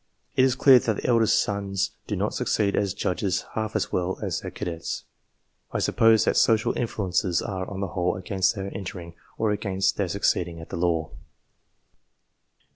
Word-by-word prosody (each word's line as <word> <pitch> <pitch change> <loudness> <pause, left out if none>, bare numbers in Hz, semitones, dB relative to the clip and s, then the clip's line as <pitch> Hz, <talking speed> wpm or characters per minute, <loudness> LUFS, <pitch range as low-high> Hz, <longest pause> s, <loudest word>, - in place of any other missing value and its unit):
It 130 - +4
is 130 -1 +3
clear 130 -3 +7
that 110 -2 -1
the - - -6
eldest 115 -3 +4
sons 100 -1 -1 0.2
do - - -2
not - - -1
succeed 100 -2 0
as 100 -1 0
judges 95 -1 -1
half 110 0 -3
as 110 - -1
well 90 +1 -1
as - - -2
the - - -5
cadets. 85 -1 -5 0.7
I - - -1
suppose 115 -1 +4
that - - +2
social 110 -1 +3
influences 95 -6 0
are, 95 -2 -4
on 95 -1 -5
the 100 - -2
whole, 90 -2 0
against 95 +1 0
their 100 -1 -5
entering, 90 -3 -6 0.2
or 110 -2 +1
against 95 -2 0
their 100 - 0
succeeding 85 -3 0
at 80 - -10
the - - -5
law. 85 -3 0
100 Hz, 175 wpm, -25 LUFS, 90-110 Hz, 0.7 s, clear